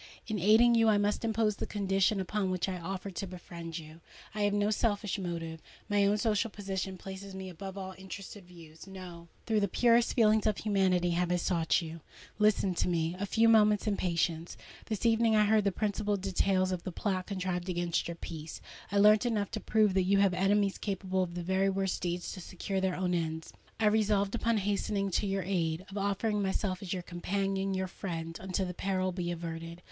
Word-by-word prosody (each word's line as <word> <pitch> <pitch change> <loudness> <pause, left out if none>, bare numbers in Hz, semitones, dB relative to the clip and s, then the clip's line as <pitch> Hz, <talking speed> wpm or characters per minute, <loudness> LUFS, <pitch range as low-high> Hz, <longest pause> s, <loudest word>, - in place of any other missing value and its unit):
In 215 -2 -2
aiding 220 +6 +6
you, 225 -1 +4
I 210 - +4
must 205 +2 0
impose 220 -2 +1
the - - -4
conditions 195 0 +1
upon 195 +1 -1
which 185 0 -1
I 185 -1 -3
offer 190 +3 -5
to 190 +2 -4
befriend 170 -2 -8
you! 160 0 -10 0.3
I 210 - -3
have 205 0 +2
no 205 +1 +2
selfish 210 -2 0
motive:—my 175 +4 -2
own 205 +1 +2
social 220 +1 +1
position 195 -2 -4
places 195 +1 -8
me 190 0 -6
above 190 +2 -8
all 190 -1 -5
interested 190 +1 -9
views. 165 -1 -14
No:—through 185 +3 -4
the 200 - +1
purest 235 +4 +3
feelings 220 -2 +4
of 215 - +1
humanity 190 -4 +2
have 175 +1 0
I - - +3
sought 170 -1 +1
you. 165 0 -8 0.4
Listen 210 -3 +3
to 175 - 0
me 170 -1 0
a 200 - -2
few 225 +3 +3
moments 210 -2 +5
in 210 -2 +1
patience. 170 -2 -1 0.3
This 215 0 -3
evening 225 -1 +4
I 210 0 +5
heard 215 0 +3
the 200 - +3
principal 205 +1 -1
details 185 0 +1
of 180 -2 -2
the 185 - -5
plot 185 0 -2
contrived 185 -2 -3
against 175 -1 -1
your 170 - -4
peace: 160 -2 -7 0.3
I 200 - +1
learnt 210 +2 +6
enough 210 -4 -1
to 220 - -3
prove 215 -2 +2
that 190 - +3
you 195 +2 +3
have 195 -2 +4
enemies 195 +1 +2
capable 190 -2 -1
of 175 -2 -3
the 175 - -3
very 190 +2 +2
worst 195 -1 -1
deeds 175 0 -2
to 185 - -7
secure 190 +2 -3
their 190 -1 0
own 180 -1 -1
ends. 160 -2 -3 0.3
I 220 - +2
resolved 210 -2 +2
upon 230 -1 +1
hastening 200 0 -1
to 205 - 0
your 195 -1 -1
aid—of 180 +1 -2
offering 205 +1 0
myself 190 0 -1
as 190 -3 -6
your 180 -2 -2
companion, 195 +2 -2
your 190 0 -1
friend, 165 -3 -5
until 190 0 -1
the 180 - -4
peril 185 0 -1
be 175 -1 -3
averted. 165 0 -5
195 Hz, 200 wpm, -31 LUFS, 180-205 Hz, 0.4 s, aiding